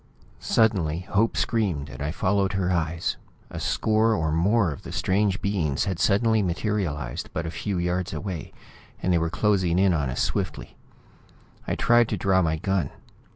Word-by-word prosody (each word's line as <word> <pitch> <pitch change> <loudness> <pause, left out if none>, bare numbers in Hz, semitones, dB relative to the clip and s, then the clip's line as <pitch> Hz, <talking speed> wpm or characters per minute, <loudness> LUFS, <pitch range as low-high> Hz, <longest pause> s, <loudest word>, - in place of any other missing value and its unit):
Suddenly, 90 -8 +1
Hope 110 +3 +2
screamed, 95 -11 0
and 70 - -9
I 75 - -1
followed 95 +3 0
her 95 -1 0
eyes. 85 -1 -1 0.3
A - - -5
score 110 +1 +2
or 80 -1 0
more 95 +4 +2
of 70 - -7
the - - -9
strange 100 0 0
beings 85 -9 0
had 95 -3 -2
suddenly 110 +5 +3
materialized 85 - -2
but 80 - -2
a 80 - -4
few 100 +2 -3
yards 90 +2 -1
away, 95 -6 -5 0.5
and 90 - +2
they 85 - +3
were 85 0 0
closing 95 -2 +1
in 95 -1 +4
on 70 -5 0
us 60 - -3
swiftly. 90 -7 -2 0.9
I - - 0
tried 120 -1 +4
to - - -1
draw 95 -1 +2
my 80 -2 +1
gun. 95 -4 -1
95 Hz, 170 wpm, -25 LUFS, 80-100 Hz, 0.9 s, in